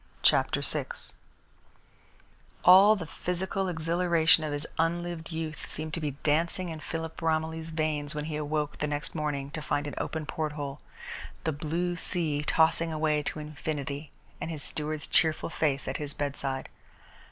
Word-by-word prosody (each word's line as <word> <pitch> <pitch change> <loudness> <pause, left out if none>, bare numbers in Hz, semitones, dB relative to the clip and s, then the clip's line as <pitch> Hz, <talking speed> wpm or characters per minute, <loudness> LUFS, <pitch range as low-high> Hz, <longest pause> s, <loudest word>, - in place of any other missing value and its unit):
CHAPTER - - +4
VI - - +1 1.8
All 195 +4 +9
the 180 -6 -4
physical 185 +4 -2
exhilaration 165 -1 +3
of 155 - -2
his 145 +1 -2
unlived 170 0 0
youth 160 -1 -4
seemed 155 0 -4
to 165 - -1
be 145 -3 -3
dancing 170 +4 +2
in 160 -1 -5
Philip 160 +1 -5
Romilly's 160 0 0
veins 155 -2 -1
when 150 0 -2
he 155 -1 -3
awoke 150 0 -1
the 150 - +1
next 150 +2 -3
morning 145 -3 -2
to 155 - -4
find 145 -1 0
an 145 - -4
open 160 -1 -2
porthole, 150 -2 -3 0.6
the 160 - +1
blue 170 +4 -1
sea 160 -4 +1
tossing 165 +2 +3
away 155 -1 +2
to 150 - -3
infinity, 150 -1 -4 0.3
and - - -2
his 155 -4 -5
steward's 155 0 -3
cheerful 160 0 +2
face 140 -5 0
at 130 - -1
his 145 -1 -4
bedside. 140 -2 -2
155 Hz, 150 wpm, -29 LUFS, 150-165 Hz, 1.8 s, All